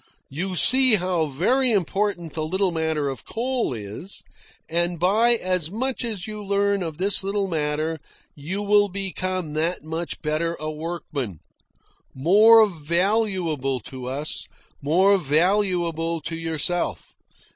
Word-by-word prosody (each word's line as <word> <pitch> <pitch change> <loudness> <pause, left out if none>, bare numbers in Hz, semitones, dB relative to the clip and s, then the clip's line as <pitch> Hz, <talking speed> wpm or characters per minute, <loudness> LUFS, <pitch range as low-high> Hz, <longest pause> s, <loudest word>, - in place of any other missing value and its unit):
"You 180 +6 -3
see 255 +5 +5
how 180 -4 0
very 240 - +2
important 195 -4 -1
the 155 - -3
little 190 +4 0
matter 160 -3 -1
of 135 -4 -5
coal 245 - -2
is, 110 - -7 0.4
and 170 +1 0
by 215 +7 +4
as 180 -6 -1
much 255 +6 -2
as 215 -6 -4
you 215 -1 -7
learn 200 0 +1
of 160 -4 -4
this 195 +2 +3
little 195 0 -1
matter 155 -1 -2 0.3
you 180 +8 -4
will 205 0 +3
become 185 -3 -3
that 160 +3 -1
much 160 +2 -5
better 160 +2 -1
a 155 0 -3
workman 150 - -5 0.8
more 215 +10 +6
valuable 170 - 0
to 125 +3 -8
us, 140 +4 -3 0.3
more 190 +7 +4
valuable 170 0 +1
to 165 - -4
yourself. 165 +1 -2
175 Hz, 130 wpm, -23 LUFS, 155-200 Hz, 0.8 s, more